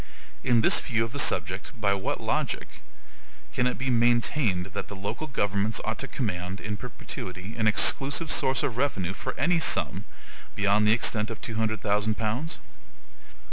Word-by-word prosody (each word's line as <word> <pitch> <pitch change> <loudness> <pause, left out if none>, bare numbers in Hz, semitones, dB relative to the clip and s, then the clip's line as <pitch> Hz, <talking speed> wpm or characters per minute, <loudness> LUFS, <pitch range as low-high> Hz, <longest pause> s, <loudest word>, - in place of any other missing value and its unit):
In 120 -2 +4
this - - +5
view 115 -1 0
of 115 - -8
the 140 - -3
subject, 90 - +1
by 100 -2 +2
what 95 -1 -2
logic - - -2 0.7
can 125 - +2
it 125 - -2
be 130 +1 -1
maintained 115 -5 +2
that - - -4
the 100 - -8
local 100 +11 -4
governments 105 -3 0
ought 110 0 -2
to 135 - -3
command, 95 -7 -3
in 110 -1 -4
perpetuity, 100 -3 -7
an 110 -2 +1
EXCLUSIVE 140 +8 +3
source 130 -1 +2
of 120 -4 -2
revenue 95 -10 0
for - - -5
any 175 -1 +2
sum - - +2 0.5
beyond 100 +1 +3
the - - +5
extent 110 -2 +1
of 115 - -6
two 115 - -6
hundred 110 -2 -1
thousand 105 +1 +1
pounds? 120 +9 -2
110 Hz, 170 wpm, -27 LUFS, 100-125 Hz, 0.7 s, this